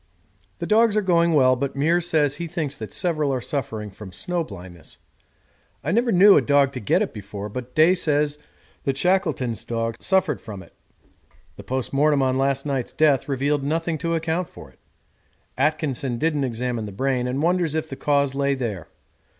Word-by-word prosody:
The -, -, -4 dB
dogs 215 Hz, +2 st, +3 dB
are 210 Hz, -, +2 dB
going 170 Hz, -2 st, +3 dB
well, 130 Hz, -2 st, +5 dB
but 140 Hz, +2 st, -3 dB
Meares 165 Hz, +5 st, +2 dB
says 150 Hz, -4 st, +1 dB
he 170 Hz, -, -4 dB
thinks 155 Hz, -4 st, -3 dB
that 110 Hz, -3 st, -8 dB
several 155 Hz, -5 st, 0 dB
are 130 Hz, -, 0 dB
suffering 110 Hz, -6 st, -4 dB
from 95 Hz, 0 st, -11 dB
snow 175 Hz, -, -2 dB
blindness. 90 Hz, -, -12 dB, 0.9 s
I 150 Hz, -, -1 dB
never 235 Hz, +4 st, +2 dB
knew 195 Hz, +1 st, +7 dB
a -, -, +5 dB
dog 140 Hz, -1 st, +3 dB
get -, -, +3 dB
it -, -, -5 dB
before, 105 Hz, 0 st, -7 dB
but 125 Hz, +3 st, -7 dB
Day 160 Hz, +4 st, +6 dB
says 150 Hz, -4 st, 0 dB, 0.5 s
that 135 Hz, -2 st, 0 dB
Shackleton's 155 Hz, -, 0 dB
dogs 115 Hz, -1 st, -3 dB
suffered 190 Hz, -4 st, +1 dB
from 100 Hz, -4 st, -8 dB
it. -, -, -20 dB, 0.8 s
The -, -, -11 dB
post 130 Hz, 0 st, -3 dB
mortem 145 Hz, 0 st, +3 dB
on 130 Hz, -1 st, +1 dB
last 135 Hz, +1 st, 0 dB
night's 135 Hz, -4 st, -2 dB
death 145 Hz, -3 st, +2 dB
revealed 140 Hz, +2 st, 0 dB
nothing 160 Hz, +2 st, -1 dB
to 165 Hz, +2 st, -1 dB
account 165 Hz, +2 st, -1 dB
for -, -, -13 dB
it. -, -, -30 dB, 0.8 s
Atkinson 140 Hz, -3 st, -1 dB
didn't 150 Hz, -1 st, 0 dB
examine 120 Hz, -2 st, -3 dB
the -, -, -7 dB
brain, 125 Hz, +3 st, -1 dB
and 135 Hz, +4 st, -2 dB
wonders 175 Hz, -2 st, +1 dB
if 160 Hz, 0 st, -1 dB
the 135 Hz, -, -7 dB
cause 140 Hz, -1 st, +1 dB
lay 140 Hz, 0 st, +1 dB
there. 105 Hz, -11 st, -4 dB
140 Hz, 180 wpm, -23 LUFS, 125-165 Hz, 0.9 s, knew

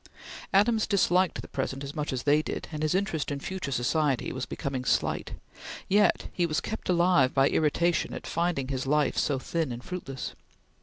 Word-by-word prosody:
Adams 220 Hz, +3 st, +3 dB
disliked 185 Hz, -3 st, +2 dB
the -, -, -9 dB
present 135 Hz, 0 st, -3 dB
as 140 Hz, +1 st, -6 dB
much 150 Hz, -2 st, -3 dB
as 130 Hz, -2 st, -3 dB
they 150 Hz, +1 st, +4 dB
did, -, -, -5 dB
and 155 Hz, -1 st, -5 dB
his 155 Hz, +3 st, +1 dB
interest 190 Hz, -6 st, -1 dB
in 145 Hz, -1 st, -3 dB
future 185 Hz, -1 st, -4 dB
society 135 Hz, +2 st, 0 dB
was 130 Hz, 0 st, -4 dB
becoming 135 Hz, -2 st, -3 dB
slight, -, -, 0 dB, 0.5 s
yet 205 Hz, -1 st, +3 dB
he 175 Hz, -1 st, +1 dB
was 155 Hz, -1 st, 0 dB
kept 220 Hz, -, -5 dB
alive 175 Hz, -7 st, +4 dB
by 135 Hz, 0 st, +5 dB
irritation 170 Hz, +3 st, +1 dB
at -, -, -7 dB
finding 170 Hz, -6 st, -1 dB
his 130 Hz, -1 st, -2 dB
life 150 Hz, 0 st, +2 dB
so 140 Hz, -, +1 dB
thin 160 Hz, +2 st, -2 dB
and 120 Hz, +1 st, -6 dB
fruitless. 135 Hz, -8 st, -5 dB
150 Hz, 185 wpm, -28 LUFS, 135-180 Hz, 0.5 s, by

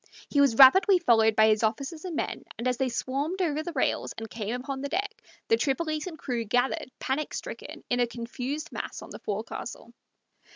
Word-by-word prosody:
He 285 Hz, -, +4 dB
was 275 Hz, -5 st, +4 dB
rapidly 370 Hz, +8 st, +8 dB
followed 225 Hz, -9 st, +4 dB
by 220 Hz, -, +6 dB
his 215 Hz, -1 st, +3 dB
officers 275 Hz, +9 st, -2 dB
and 350 Hz, -3 st, -4 dB
men, -, -, -3 dB
and 235 Hz, +3 st, -2 dB
as 250 Hz, -1 st, +1 dB
they 265 Hz, 0 st, 0 dB
swarmed 275 Hz, +9 st, -2 dB
over 310 Hz, -4 st, 0 dB
the 345 Hz, -, -5 dB
rails 265 Hz, -, 0 dB
and 225 Hz, -, -5 dB
came 220 Hz, +1 st, -4 dB
upon 265 Hz, +2 st, -5 dB
the 280 Hz, -, -3 dB
deck, 410 Hz, +6 st, -3 dB, 0.3 s
the 455 Hz, -, +4 dB
Tripolitan 310 Hz, +2 st, -1 dB
crew 245 Hz, -5 st, -2 dB
gathered, 245 Hz, +4 st, 0 dB
panic 280 Hz, +3 st, -2 dB
stricken, -, -, -7 dB
in 245 Hz, -, 0 dB
a 245 Hz, -, +3 dB
confused 245 Hz, +5 st, -5 dB
mass -, -, -5 dB
on -, -, -12 dB
the -, -, -8 dB
forecastle. 220 Hz, +3 st, -5 dB
265 Hz, 195 wpm, -28 LUFS, 235-310 Hz, 0.3 s, rapidly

